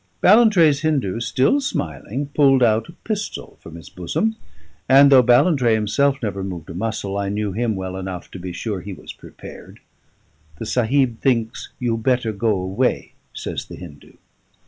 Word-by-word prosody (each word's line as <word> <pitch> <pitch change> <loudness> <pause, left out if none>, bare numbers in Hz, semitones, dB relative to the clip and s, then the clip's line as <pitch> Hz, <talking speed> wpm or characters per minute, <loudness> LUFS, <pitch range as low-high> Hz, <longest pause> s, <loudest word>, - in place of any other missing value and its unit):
Ballantrae's 185 - +5
Hindu, 140 - 0
still 130 - +1
smiling, 120 - -4
pulled 135 -3 +4
out 110 +1 +2
a - - -11
pistol 210 +3 -6
from 80 - -11
his 85 - -11
bosom, 210 - -2 0.5
and 140 +1 +7
though 130 -2 +8
Ballantrae 125 0 +3
himself 135 +6 +1
never 100 -3 -3
moved 90 -4 -7
a - - -7
muscle 100 0 -3
I 100 -1 -2
knew 105 0 -2
him 110 +2 -1
well 95 -1 -5
enough 95 -2 -7
to 95 - -9
be 90 0 -6
sure 95 +2 -4
he 100 +3 -7
was - - -10
prepared. - - -13 0.8
"The - - -6
Sahib 125 +1 +1
thinks 115 -4 -1
you 120 -2 -1
better 120 0 0
go 110 +2 -1
away," 95 +8 -1 0.2
says - - -5
the - - -10
Hindu. 75 -5 -13
115 Hz, 165 wpm, -21 LUFS, 95-135 Hz, 0.8 s, though